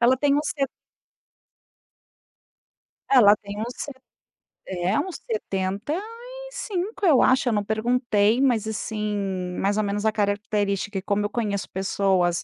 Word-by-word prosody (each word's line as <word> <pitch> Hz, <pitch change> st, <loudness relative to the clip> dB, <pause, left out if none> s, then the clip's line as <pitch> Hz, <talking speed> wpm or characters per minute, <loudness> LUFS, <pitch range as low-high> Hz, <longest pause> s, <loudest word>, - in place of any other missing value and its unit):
Ela 245 Hz, +2 st, +5 dB
tem 280 Hz, +1 st, +2 dB
uns 295 Hz, 0 st, 0 dB
se 275 Hz, -3 st, 0 dB, 2.4 s
Ela 220 Hz, -6 st, +8 dB
tem 205 Hz, 0 st, -8 dB
uns 240 Hz, +3 st, -4 dB
se 290 Hz, -, -5 dB, 0.8 s
é 185 Hz, +2 st, 0 dB
uns 375 Hz, -2 st, -3 dB
75, 415 Hz, -, -3 dB
eu 290 Hz, -7 st, +6 dB
acho. 260 Hz, 0 st, +4 dB
Eu -, -, +1 dB
não 205 Hz, -1 st, +1 dB
perguntei. 220 Hz, +1 st, +2 dB
Mas 235 Hz, -5 st, +2 dB
assim, 215 Hz, -1 st, -2 dB, 0.4 s
mais 200 Hz, +1 st, +1 dB
ou 215 Hz, -, +2 dB
menos 205 Hz, +1 st, -2 dB
a 220 Hz, -, +4 dB
característica, 205 Hz, -1 st, -1 dB
e -, -, -2 dB
como 205 Hz, +1 st, 0 dB
eu -, -, -1 dB
conheço 205 Hz, -3 st, -2 dB
pessoas 190 Hz, -2 st, +1 dB
215 Hz, 135 wpm, -24 LUFS, 200-275 Hz, 2.4 s, Ela